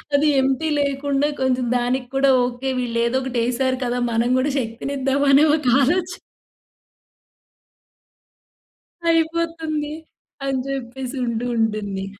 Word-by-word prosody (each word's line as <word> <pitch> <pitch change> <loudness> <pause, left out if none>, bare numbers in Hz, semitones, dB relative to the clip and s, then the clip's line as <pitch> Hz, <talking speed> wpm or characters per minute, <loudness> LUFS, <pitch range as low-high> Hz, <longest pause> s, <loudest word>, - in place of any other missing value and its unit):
అది 300 +2 +3
ఎంప్టీ 270 +4 0
లేకుండా 280 0 0
కొంచెం 255 -1 +1
దానికి 250 +1 -1
కూడా 275 0 +4 0.2
ఓకే. 250 +2 -4
వీళ్ళేదోకటేసారు 245 +1 0
కదా! 245 0 -1
మనం 230 +2 +1
కూడా 270 +3 +1
శక్తినిద్దాం 270 +4 -2
అనే 280 +2 +6
ఒక 270 -6 +1
ఆలోచ 355 +5 0 2.9
అయిపోతుంది. 325 -2 -1 0.5
అని 270 -1 0
జెప్పేసి 265 0 -5
ఉంటూ 235 +1 -2
ఉంటుంది. 210 -3 -1
265 Hz, 100 wpm, -21 LUFS, 245-285 Hz, 2.9 s, అనే